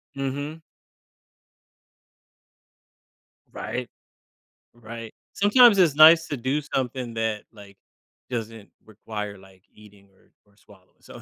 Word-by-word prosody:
Mhm. 145 +4 -5 2.9
Right. - - -5 0.9
Right. 115 -1 -10 0.2
Sometimes 220 +1 +5
it's 170 -7 +3
nice 165 +2 +7
to 145 - -4
do 130 +5 -2
something 130 -4 -4
that, 110 -2 -2
like, 100 -3 -16 0.5
doesn't 115 -3 -6 0.2
require, 105 -1 -7
like, 95 0 -20
eating 100 -2 -19
or 95 - -30 0.2
or 100 - -31
swallowing, 95 -3 -23
so, - - -13
115 Hz, 100 wpm, -24 LUFS, 105-145 Hz, 2.9 s, nice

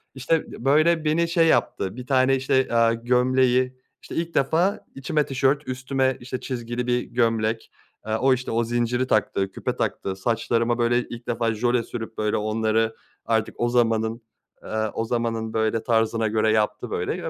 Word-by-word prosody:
İşte, 145 +5 -1
b 120 - -9
böyle, 155 +3 +3
beni 165 +2 +2
şey 165 -1 +3
yaptı, 95 -9 +1
bir 125 0 -8
tane, 135 0 +3
işte, 130 0 +1
aaa, 115 0 +4
gömleği, 125 +1 +2 0.2
işte, - - -9
ilk 165 0 -2
defa 165 +8 +1
içime 150 +2 0
tişört, 135 +2 0
üstüme, 130 0 -1
işte, 130 0 -5
çizgili 120 -1 -4
bir 125 0 +2
gömlek. 115 -2 -1 0.3
Aaa, 110 +1 -1
o, 130 +2 +4
işte, 125 -1 -3
o 115 +1 +1
zinciri 120 +2 0
taktı, 100 -3 0
küpe - - -3
taktı. 95 -1 -2
Saçlarıma, 115 +3 0
böyle, 120 +1 +3
ilk 120 0 -8
defa 115 -1 0
jöle 120 +2 +1
sürüp, 115 -1 -7
böyle 105 0 0
onları, 110 +1 0 0.3
artık 110 -1 0
o 120 - +1
zamanın, 115 -1 +1 0.4
aaa, 110 0 -2
o 115 - -2
zamanın 115 -1 -2
böyle 110 0 0
tarzına 115 -1 +1
göre 110 0 +2
yaptı, 105 -1 0
böyle - - -2
ve - - -3
120 Hz, 170 wpm, -24 LUFS, 115-130 Hz, 0.4 s, aaa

